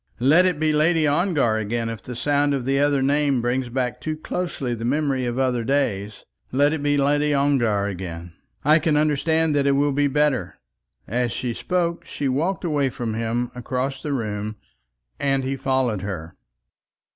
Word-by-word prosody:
Let 155 +9 +5
it 175 -5 -1
be 155 -1 +2
Lady 155 +1 +3
Ongar 145 - +2
again 115 +2 -2
if 115 -3 -5
the 125 - -8
sound 145 +3 +1
of 130 -3 -3
the 135 +1 +1
other 140 -1 +2
name 140 -1 +2
brings 120 +1 -1
back 125 -2 -2
too 155 0 -3
closely 155 -6 -3
the 115 -1 -5
memory 135 0 0
of 120 +1 -3
other 125 -3 +1
days. 110 -7 -1 0.3
Let 145 +3 +3
it 160 - -2
be 145 0 +1
Lady 145 +1 +2
Ongar 120 -8 +2
again. 90 -3 -6 0.3
I 155 +2 +6
can 155 -2 +1
understand 155 +1 +2
that 140 -1 +2
it 140 - +4
will 145 +1 +2
be 145 +1 +2
better." 145 -2 0 0.5
As 120 +2 0
she 125 -2 -3
spoke 170 +4 -1
she 140 - -4
walked 160 +10 -1
away 145 -4 +1
from 120 -3 -4
him 115 +2 -2
across 130 +2 -3
the 150 - -4
room, 110 -4 -3 0.6
and 135 -1 +1
he 135 +1 -2
followed 130 -6 0
her. 90 -5 -6
135 Hz, 180 wpm, -23 LUFS, 120-145 Hz, 0.6 s, I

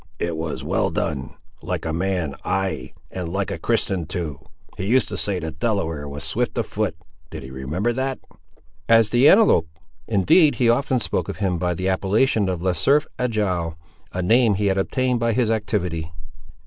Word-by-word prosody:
"It 85 -1 -2
was 80 -1 -4
well - - +1
done! 65 0 -3 0.3
like - - -3
a 80 - -2
man: 90 -4 -1
ay! 95 -10 -2 0.2
and 90 -3 -4
like 95 +1 -2
a - - -4
Christian, 90 -5 0
too! 85 -5 -4 0.4
He 95 - -4
used 125 +2 +3
to - - -4
say 100 -2 -1
the 80 -2 -4
Delaware 80 -6 -2
was 70 +1 -7
swift 120 +11 -2
of 115 - +1
foot—did 80 -9 -6
he 65 - -9
remember 80 - -2
that?" 130 +1 -2 0.7
"As 115 -2 +5
the 125 +5 +6
antelope! 195 - +5 0.4
Indeed, 115 - +4
he 120 -3 +2
often 130 +1 +1
spoke - - -2
of - - -5
him 95 -4 0
by 90 0 0
the 95 +3 -2
appellation 100 +2 +2
of 90 -2 -3
Le 95 -1 +2
Cerf 140 - +3
Agile, 95 -9 -1 0.3
a 90 - -3
name 115 +2 +4
he 105 +2 -1
had 95 -1 +2
obtained 125 +4 0
by 115 0 +1
his 115 -1 +1
activity." 90 -7 -2
95 Hz, 180 wpm, -22 LUFS, 80-115 Hz, 0.7 s, the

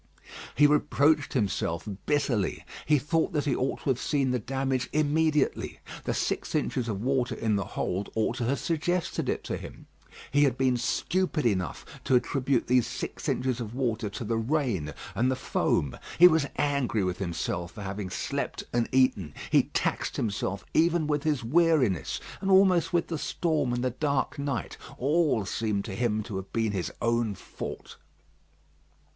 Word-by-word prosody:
He 145 - +6
reproached 150 0 +3
himself 95 -6 -1 0.2
bitterly. 140 -9 0 0.2
He 150 0 +5
thought 160 +5 0
that 150 -3 0
he 135 -4 +1
ought 130 - -2
to - - -1
have 125 - -1
seen 140 -3 +1
the 125 - +1
damage 130 +1 -1
immediately. 155 0 +1 0.3
The - - 0
six - - -2
inches 120 -2 0
of 105 -1 -3
water 130 -2 +1
in 110 -1 0
the 100 - 0
hold 95 +3 -1
ought 110 +2 0
to 120 - -1
have 135 +4 +1
suggested 170 +5 -1
it - - -1
to - - -3
him. - - -10 0.5
He 145 +1 +5
had 130 -3 +1
been 130 -1 +2
stupid 155 +6 0
enough 95 - 0 0.2
to 130 - +3
attribute 130 0 +1
these 125 -1 +3
six - - -4
inches 130 -1 0
of 115 -1 -5
water 115 -5 -1
to 100 - -6
the 115 +1 -1
rain 115 - -1 0.2
and 125 +3 +1
the 130 - +1
foam. 75 - 0 0.2
He 175 - +10
was 160 -4 +3
angry 140 -7 +1
with 90 -1 -2
himself 85 -1 -3
for 105 - -8
having 95 0 -4
slept - - -3
and 120 -1 +1
eaten; 130 - +2 0.2
he - - +5
taxed - - -1
himself 100 -2 -2
even 170 0 +3
with 150 -1 0
his 145 -4 0
weariness, 140 - +2 0.2
and 195 - -1
almost 190 -3 +5
with 170 -1 +2
the 165 -3 -2
storm 155 -7 0
and 120 0 -1
the 130 - +1
dark 140 +2 -1
night. 140 - -3 0.2
All 145 - +2
seemed 105 -1 -1
to 110 - -5
him 110 -1 0
to 100 -3 -5
have 95 0 -7
been 115 -2 0
his 95 -3 -2
own 115 -3 +1
fault. - - -8
125 Hz, 175 wpm, -28 LUFS, 110-145 Hz, 0.5 s, He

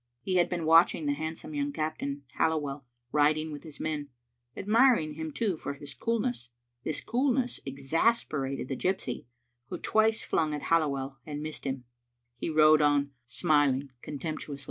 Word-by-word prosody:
He 185 -1 +1
had 175 - +3
been 175 -3 -2
watching 165 0 +5
the 145 - +2
handsome 155 +1 -5
young 145 0 -1
captain, 145 -2 -3 0.2
Halliwell, 145 -4 0 0.2
rid 150 +1 +4
ing 155 0 -3
with 145 - -7
his 155 -3 -11
men; 150 -2 -3 0.5
admiring 220 - +4
him, 160 +1 -5
too, 200 +3 0
for 140 - -5
his 140 0 -8
coolness. 230 - -1 0.3
This 155 - -2
coolness 250 +1 0
exasperated 140 - 0
the 135 - -2
gypsy, 160 -8 -2 0.4
who 180 - -4
twice 220 +4 +2
flung 155 -2 0
at 145 - -6
Halliwell 140 -5 +1
and 150 0 -5
missed 155 0 -6
him. 130 -2 -3 0.5
He 120 - -3
rode 155 0 +6
on 145 -1 +3 0.2
smiling 140 0 +2
contemptuously. 150 -1 -5
155 Hz, 155 wpm, -29 LUFS, 140-165 Hz, 0.5 s, rode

